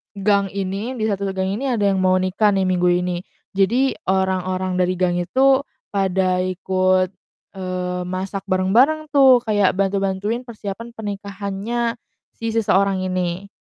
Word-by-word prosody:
gang 200 0 +2
ini 200 +6 -3
di - - -1
satu 200 0 -2
se 195 - -3
gang 190 0 -1
ini 275 - -2
ada 205 -3 0
yang 190 - 0
mau 185 0 +4
nikah 195 +3 +2
nih 190 - +2
minggu 180 -1 +2
ini, 180 -1 -2 0.4
jadi 240 +8 +2
orang-orang 185 -1 0
dari 185 0 +1
gang 180 -1 +2
itu 265 +9 +3 0.4
pada 190 -1 +1
ikut, 185 0 +1 0.5
eee, 180 -1 -3
masak 190 +1 -4
bareng-bareng 245 +12 +3
tuh, 265 -3 +7
kayak 205 -3 +3
bantu-bantuin 195 +4 -1
persiapan 225 0 -7
pernikahannya 205 +3 -3 0.4
si 230 0 -3
seseorang 195 -3 +2
ini, 185 +1 -2
195 Hz, 140 wpm, -21 LUFS, 185-215 Hz, 0.5 s, tuh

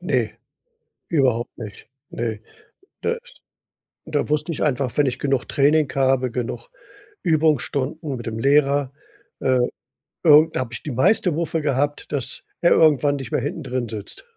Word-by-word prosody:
Ne, - - 0 0.8
überhaupt 130 -7 +1
nicht, 105 -5 -9 0.2
ne. 115 -2 -3 0.6
Das 470 - 0 0.9
da 150 -2 -1
wusste 150 +2 0
ich - - -4
einfach, 135 -4 0
wenn 145 -2 +4
ich 130 0 -2
genug 135 -2 0
Training 150 0 +3
habe, 130 -2 +2
genug 125 - -4 0.6
Übungsstunden 155 -2 0
mit 120 - -8
dem 115 -1 -4
Lehrer, 140 +1 +3 0.5
äh, 130 -1 +2 0.6
irgend 155 0 +6
da - - +1
habe 120 -2 -5
ich - - -7
die 150 - -4
meiste 165 - +3
Muffe 165 +1 -1
gehabt, 145 0 -1
dass 140 -5 -2 0.2
er 175 - +4
irgendwann 145 -2 +4
nicht 130 -4 -7
mehr - - +1
hinten - - -4
drin 125 -1 -2
sitzt. 105 - -7
140 Hz, 150 wpm, -22 LUFS, 125-150 Hz, 0.9 s, irgend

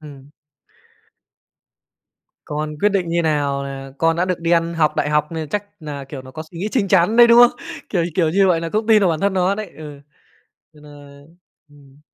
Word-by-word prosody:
ừm. 145 -2 -13 2.2
Còn 150 +1 -4
quyết 210 - +3
định 190 -3 -1
như 170 +1 0
nào 145 -3 -1
là 135 0 -8
con 165 +2 +2
đã 175 +2 0
được 180 -2 -2
đi 165 0 -2
ăn 170 0 +1
học 160 -2 +1
đại - - -1
học 150 +1 0
nên 160 -2 -5
chắc 205 +4 -2 0.2
nà, 145 -3 -7
kiểu, 135 -3 -7
nó 130 - -13
có 155 +3 -7
suy 170 - -10
nghĩ 200 - -2
chín 220 -7 0
chắn 190 +3 +3
đấy, 240 0 +7
đúng 235 0 +6
không? 245 0 +5 0.3
Kiểu 175 -4 0
kiểu 165 -4 +2
như 195 +4 +3
vậy, 170 -3 +1
là 165 - -4
cũng 215 +4 -2
tin 220 -2 +5
vào 190 - +3
bản 160 -2 -1
thân 200 +2 0
nó 185 +1 +1
đấy. 215 0 -7
Ừ, 150 -2 -10 0.8
thì 150 - -18
nà 150 - -14 0.8
ừm 140 -1 -20
165 Hz, 220 wpm, -19 LUFS, 150-190 Hz, 2.2 s, đấy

